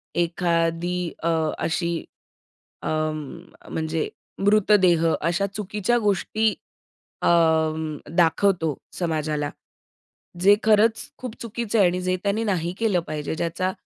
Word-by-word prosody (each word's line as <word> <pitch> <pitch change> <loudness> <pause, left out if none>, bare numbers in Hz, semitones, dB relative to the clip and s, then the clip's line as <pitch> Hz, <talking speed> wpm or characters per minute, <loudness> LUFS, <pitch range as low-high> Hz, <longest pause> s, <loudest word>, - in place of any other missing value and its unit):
एखादी 170 0 0 0.2
अ, 170 - +2 0.3
अशी 170 0 -1 0.8
अं, 155 +1 -4
म्हणजे 160 0 -2 0.3
मृतदेह 195 -4 +4 0.2
अशा 175 +5 +1
चुकीच्या 210 +3 0
गोष्टी 215 +1 +1 0.7
अं, 160 -2 +2 0.2
दाखवतो 165 -2 +3 0.2
समाजाला. 155 -4 -1 0.9
जे 200 +2 +7
खरंच 220 +1 +3
खूप 250 -2 -7
चुकीचं 230 -1 -2
आहे 190 - +6
आणि 180 +1 -1
जे 185 0 0
त्यांनी 205 +3 0
नाही 180 -5 -1
केलं 215 -6 +2
पाहिजे, 150 +1 -3
ज्याचा 170 +3 -1
175 Hz, 105 wpm, -24 LUFS, 160-205 Hz, 0.9 s, जे